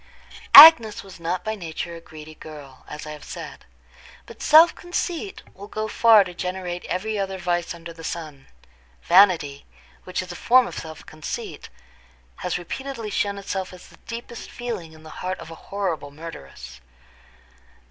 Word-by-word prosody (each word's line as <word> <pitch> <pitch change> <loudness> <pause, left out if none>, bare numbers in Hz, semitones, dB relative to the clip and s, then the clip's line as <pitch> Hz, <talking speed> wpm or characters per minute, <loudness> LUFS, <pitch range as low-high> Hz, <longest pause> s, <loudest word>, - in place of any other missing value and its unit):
Agnes 235 -10 +10
was 190 -2 -13
not 175 +2 -3
by 220 - -3
nature 170 -3 -6
a 165 - -11
greedy 155 -1 -12
girl, 145 -4 -13
as 150 +1 -8
I 155 - -7
have 150 -1 -10
said; - - -9 0.6
but - - -14
self 320 +3 +7
conceit 355 +2 -5
will 200 +2 -11
go 215 +1 -4
far 220 -1 +5
to 180 -2 -9
generate 180 0 -5
every 210 +3 -3
other 195 -1 -3
vice 175 -1 -2
under 170 0 -10
the 165 0 -13
sun. 155 -5 -7 0.6
Vanity, 170 -7 +4 0.4
which 185 0 -4
is 180 - -10
a - - -8
form 255 +7 +4
of - - -6
self 160 -1 -10
conceit, 155 -1 -7 0.7
has 180 - -3
repeatedly 230 +5 -6
shown 200 0 -1
itself 195 -1 -5
as 180 - -14
the - - -19
deepest 235 0 -8
feeling 215 -10 -6
in 160 0 -16
the 155 - -12
heart 185 +1 -3
of 160 - -11
a - - -8
horrible 180 -8 -3
murderess. 140 - -11
180 Hz, 165 wpm, -23 LUFS, 160-215 Hz, 0.7 s, Agnes